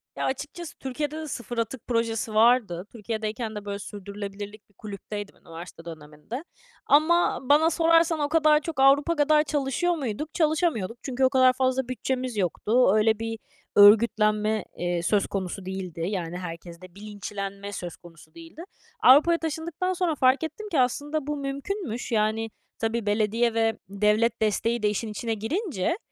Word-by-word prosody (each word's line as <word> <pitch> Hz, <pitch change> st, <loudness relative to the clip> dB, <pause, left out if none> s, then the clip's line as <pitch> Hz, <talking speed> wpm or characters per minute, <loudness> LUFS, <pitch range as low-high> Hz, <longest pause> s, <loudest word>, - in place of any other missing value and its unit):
Ya, -, -, -2 dB
açıkçası 295 Hz, +4 st, -5 dB
Türkiye'de 295 Hz, +3 st, -4 dB
de 315 Hz, -1 st, -5 dB
sıfır 240 Hz, -3 st, -6 dB
atık 230 Hz, +1 st, -3 dB
projesi 230 Hz, -2 st, -1 dB
vardı. 215 Hz, -6 st, +3 dB
Türkiye'deyken 220 Hz, 0 st, -4 dB
de, 205 Hz, 0 st, -7 dB
böyle, 200 Hz, 0 st, -4 dB
sürdürülebilirlik 205 Hz, +1 st, -8 dB
bir -, -, -30 dB
kulüpteydim 205 Hz, 0 st, -7 dB
üniversite 165 Hz, 0 st, -11 dB
döneminde. 155 Hz, -, -8 dB, 0.4 s
Ama 335 Hz, +4 st, +3 dB
bana 295 Hz, +5 st, +4 dB
sorarsan 330 Hz, 0 st, +3 dB
o 290 Hz, -1 st, 0 dB
kadar 310 Hz, -1 st, +4 dB
çok 315 Hz, -2 st, -5 dB
Avrupa 280 Hz, +5 st, +4 dB
kadar 300 Hz, +1 st, +4 dB
çalışıyor 290 Hz, +4 st, 0 dB
muyduk? 290 Hz, +1 st, -4 dB
Çalışamıyorduk 305 Hz, -, 0 dB
çünkü 265 Hz, -1 st, -2 dB
o 260 Hz, -, +6 dB
kadar 255 Hz, -1 st, +5 dB
fazla 260 Hz, 0 st, 0 dB
bütçemiz 255 Hz, -2 st, -3 dB
yoktu. 210 Hz, +5 st, +2 dB
Öyle 215 Hz, 0 st, +3 dB
bir 225 Hz, -1 st, -4 dB, 0.4 s
örgütlenme, 215 Hz, 0 st, +5 dB
eee, 175 Hz, -1 st, -1 dB
söz 205 Hz, +3 st, +2 dB
konusu 190 Hz, -1 st, -4 dB
değildi, 185 Hz, -3 st, -5 dB
yani, 175 Hz, -3 st, -3 dB
herkeste 175 Hz, 0 st, -9 dB
bilinçlenme 200 Hz, -1 st, -6 dB
söz 175 Hz, -3 st, -6 dB
konusu 170 Hz, -2 st, -17 dB
değildi. 330 Hz, 0 st, -11 dB, 0.4 s
Avrupa'ya 305 Hz, +6 st, +7 dB
taşındıktan 325 Hz, +3 st, -3 dB
sonra 350 Hz, -4 st, 0 dB
fark 260 Hz, +3 st, +3 dB
ettim 425 Hz, +6 st, -6 dB
ki 315 Hz, -, +1 dB
aslında 290 Hz, +4 st, 0 dB
bu 295 Hz, 0 st, -2 dB
mümkünmüş. 275 Hz, -, -4 dB
Yani, 220 Hz, +1 st, +1 dB, 0.3 s
tabii 225 Hz, -1 st, -1 dB
belediye 220 Hz, +3 st, +1 dB
ve 225 Hz, -1 st, +1 dB
devlet 210 Hz, +3 st, +1 dB
desteği 220 Hz, +2 st, 0 dB
de 210 Hz, -, +4 dB
işin 210 Hz, +2 st, -3 dB
içine 225 Hz, +2 st, -3 dB
girince 260 Hz, -, -2 dB
230 Hz, 150 wpm, -26 LUFS, 205-290 Hz, 0.4 s, Avrupa'ya